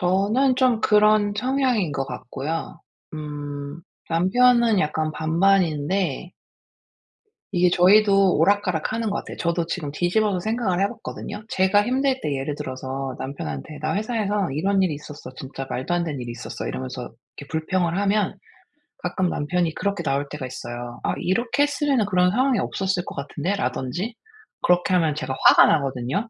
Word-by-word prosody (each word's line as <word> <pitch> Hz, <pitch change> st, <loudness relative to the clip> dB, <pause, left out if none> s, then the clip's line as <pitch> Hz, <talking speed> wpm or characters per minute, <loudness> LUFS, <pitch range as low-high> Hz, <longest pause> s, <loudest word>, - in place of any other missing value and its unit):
저는 210 Hz, +9 st, +2 dB
좀 250 Hz, -4 st, +3 dB
그런 210 Hz, -1 st, +4 dB
성향인 250 Hz, -, +1 dB
것 135 Hz, -1 st, -1 dB
같고요. 135 Hz, +5 st, -5 dB, 0.3 s
음. 145 Hz, 0 st, -6 dB, 0.3 s
남편은 235 Hz, +6 st, +4 dB
약간 155 Hz, -1 st, -1 dB
반반인데. 170 Hz, -1 st, +1 dB, 1.2 s
이게 180 Hz, -1 st, +4 dB
저희도 195 Hz, 0 st, +5 dB
오락가락하는 205 Hz, +4 st, +1 dB
것 205 Hz, -, -1 dB
같아요. -, -, -7 dB
저도 170 Hz, 0 st, 0 dB
지금 160 Hz, -4 st, -4 dB
뒤집어서 185 Hz, +5 st, +1 dB
생각을 215 Hz, -2 st, -1 dB
해 200 Hz, -, +3 dB
봤거든요. 220 Hz, -1 st, -7 dB
제가 190 Hz, +2 st, +3 dB
힘들 260 Hz, +3 st, +1 dB
때 145 Hz, -2 st, -1 dB
예를 135 Hz, +2 st, -3 dB
들어서 130 Hz, -1 st, -5 dB
남편한테 135 Hz, -, -6 dB
"나 155 Hz, +1 st, -1 dB
회사에서 210 Hz, -, -1 dB
이런 190 Hz, +7 st, +1 dB
일이 175 Hz, -5 st, 0 dB
있었어. 150 Hz, -2 st, -9 dB
진짜 135 Hz, 0 st, -7 dB
말도 130 Hz, +8 st, -3 dB
안 175 Hz, -, 0 dB
되는 150 Hz, -6 st, -4 dB
일이 120 Hz, -, -6 dB
있었어." 120 Hz, +1 st, -6 dB
이러면서 130 Hz, -1 st, -5 dB, 0.3 s
이렇게 145 Hz, -, -9 dB
불평을 170 Hz, +2 st, 0 dB
하면 200 Hz, 0 st, +1 dB, 0.7 s
가끔 180 Hz, 0 st, 0 dB
남편이 165 Hz, +2 st, -1 dB
그렇게 200 Hz, -3 st, -2 dB
나올 140 Hz, 0 st, -1 dB
때가 150 Hz, -3 st, -5 dB
있어요. 120 Hz, -1 st, -7 dB
"아. -, -, 0 dB
이렇게 235 Hz, +9 st, +1 dB
했으면은 285 Hz, -5 st, +1 dB
그런 180 Hz, -2 st, +3 dB
상황이 255 Hz, 0 st, +2 dB
없었을 190 Hz, -2 st, -1 dB
것 -, -, -8 dB
같은데."라든지 175 Hz, -, -3 dB, 0.5 s
그렇게 180 Hz, +1 st, +2 dB
하면 165 Hz, -4 st, +3 dB
제가 135 Hz, -2 st, -4 dB
화가 -, -, +9 dB
나거든요. 135 Hz, -, 0 dB
180 Hz, 350 characters per minute, -23 LUFS, 145-205 Hz, 1.2 s, 화가